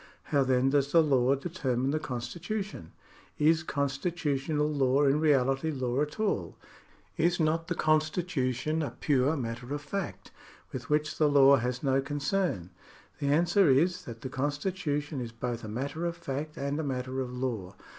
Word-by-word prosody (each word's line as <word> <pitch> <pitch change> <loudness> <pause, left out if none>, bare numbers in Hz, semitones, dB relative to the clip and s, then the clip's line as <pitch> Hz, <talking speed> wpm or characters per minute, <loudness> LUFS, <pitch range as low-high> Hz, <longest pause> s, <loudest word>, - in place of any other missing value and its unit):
How 140 -1 +5
then 130 0 +2
does 140 0 +2
the 165 -1 +6
law 135 -3 +3
determine 135 -5 -1
the 155 - 0
constitu 155 - -4
tion? 85 - -11 0.5
Is 160 +2 +4
constitutional 145 0 -1
law 140 -2 +2
in 140 +1 +3
reality 135 -1 +2
law 130 -2 -1
at 150 +6 -3
all? 100 - -1 0.6
Is 175 +2 +2
not 165 +1 +1
the 175 - -1
constitution 155 -2 0
a 150 - -4
pure 145 +2 +2
matter 120 -1 -4
oifact, 145 +7 -5 0.4
with 130 -1 -6
which 150 +1 0
the 155 -2 +4
law 140 -1 +7
has 125 +1 -2
no 135 -1 +2
concern? 145 - -1 0.5
The 140 - -1
answer 170 +5 +4
is, 165 +7 +2
that 115 -1 -8
the 130 - -5
constitution 145 0 -2
is 120 -2 -5
both 120 0 -4
a - - -6
matter 140 +10 -3
of 170 0 -4
fact 150 -1 -5
and 140 +2 -2
a - - -1
matter 130 -1 -2
of 125 -1 -4
law. 120 -7 -4
140 Hz, 165 wpm, -29 LUFS, 130-155 Hz, 0.6 s, law